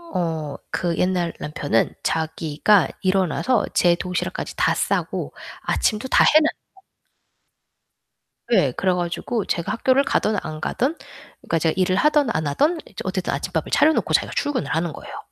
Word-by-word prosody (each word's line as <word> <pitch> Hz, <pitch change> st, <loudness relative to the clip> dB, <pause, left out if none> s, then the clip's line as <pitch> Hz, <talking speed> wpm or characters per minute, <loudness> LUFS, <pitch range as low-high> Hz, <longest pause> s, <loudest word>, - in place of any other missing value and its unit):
어 160 Hz, -5 st, -2 dB, 0.2 s
그 170 Hz, -2 st, -1 dB
옛날 180 Hz, -2 st, 0 dB
남편은 145 Hz, -6 st, 0 dB
자기가 160 Hz, +4 st, +2 dB
일어나서 190 Hz, +6 st, +1 dB
제 175 Hz, -1 st, +4 dB
도시락까지 180 Hz, +1 st, -4 dB
다 -, -, +3 dB
싸고 -, -, -1 dB, 0.3 s
아침도 215 Hz, +3 st, 0 dB
다 -, -, +5 dB
해 310 Hz, -, +6 dB
놔요. 380 Hz, +5 st, -4 dB, 1.7 s
네, 185 Hz, -, +3 dB
그래 185 Hz, -1 st, +1 dB
가지고 180 Hz, +5 st, -2 dB
제가 170 Hz, -, -2 dB
학교를 260 Hz, +4 st, +2 dB
가든 215 Hz, -5 st, +1 dB
안 155 Hz, -1 st, -7 dB
가든, 265 Hz, -, -1 dB, 0.5 s
그러니까 165 Hz, -, -1 dB
제가 160 Hz, 0 st, +1 dB
일을 185 Hz, 0 st, +2 dB
하든 295 Hz, 0 st, +3 dB
안 155 Hz, -1 st, -2 dB
하든 295 Hz, -, +1 dB
이제 -, -, -18 dB
어쨌든 185 Hz, -1 st, -2 dB
아침밥을 160 Hz, +3 st, -3 dB
차려 315 Hz, +1 st, +5 dB
놓고 -, -, -1 dB
자기가 -, -, +2 dB
출근을 290 Hz, -4 st, -1 dB
하는 165 Hz, -1 st, -1 dB
거예요. -, -, -9 dB
180 Hz, 325 characters per minute, -22 LUFS, 160-235 Hz, 1.7 s, 해